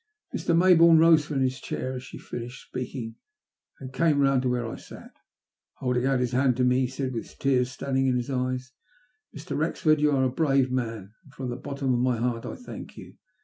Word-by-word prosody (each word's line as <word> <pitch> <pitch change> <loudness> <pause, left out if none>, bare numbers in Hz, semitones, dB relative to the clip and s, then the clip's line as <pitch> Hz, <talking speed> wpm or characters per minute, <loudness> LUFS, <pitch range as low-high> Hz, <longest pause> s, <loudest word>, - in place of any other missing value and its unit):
Mr. 170 - +1
Maybourne 170 -2 +7
rose 160 -1 +6
from 140 -3 -1
his 130 0 -1
chair 130 - -4
as 125 - -5
she 125 - -10
finished 120 +2 -8
speaking, 120 -3 -6 0.6
and 130 -1 -9
came 155 0 +2
round 135 -2 +3
to 130 - 0
where 125 -1 -1
I 115 - -5
sat. - - -12 0.6
Holding 125 0 0
out 135 -2 +2
his 125 -1 0
hand 130 0 +2
to 130 - +2
me, 125 0 +3
he 130 - +1
said, 130 0 -4
with 115 - -7
tears 130 -2 +1
standing 135 +1 -1
in 130 - +2
his 125 +3 -3
eyes: 130 0 -2 0.3
" 245 0 -30
Mr. 155 +5 -6
Wrexford, 155 -1 +1
you 150 - +4
are 135 -2 +2
a 130 - +1
brave 135 -3 +2
man, 115 -5 -3
and 140 - -19
from 130 -3 -4
the - - -3
bottom 135 0 -2
of 120 - +1
my 125 -1 +1
heart 115 0 -2
I - - -5
thank 250 - -10
you. - - -11
130 Hz, 220 wpm, -26 LUFS, 125-140 Hz, 0.6 s, Maybourne